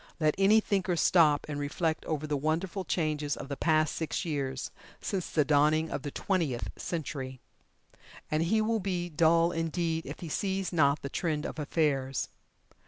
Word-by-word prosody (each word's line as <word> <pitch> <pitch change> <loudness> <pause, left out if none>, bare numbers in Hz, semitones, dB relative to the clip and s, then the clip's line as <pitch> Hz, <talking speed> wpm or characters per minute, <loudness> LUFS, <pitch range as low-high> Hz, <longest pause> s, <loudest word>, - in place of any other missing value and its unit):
Let 155 -2 +3
any 205 +3 +6
thinker 195 -4 0
stop 160 -3 +4
and 145 -1 -4
reflect 155 +3 -1
over 155 -1 -2
the 150 -1 -1
wonderful 165 +6 -1
changes 150 -5 -1
of 135 - -7
the 140 - -2
past 155 0 +2
six 160 +1 -2
years 135 -5 -3 0.3
since 190 -4 -3
the 150 -3 +2
dawning 155 +2 +3
of - - -2
the 145 - -4
Twentieth 155 -7 -1
Century, 145 -6 -4 0.9
and 155 +1 +2
he 215 +7 +2
will 225 +1 +1
be 180 -3 -2
dull 165 +1 +4
indeed 165 0 -1
if - - -7
he 170 - -5
sees 190 +3 -2
not 140 -3 +3
the 140 - -3
trend 155 -1 -1
of - - -5
affairs. 140 -3 0
155 Hz, 170 wpm, -30 LUFS, 145-175 Hz, 0.9 s, any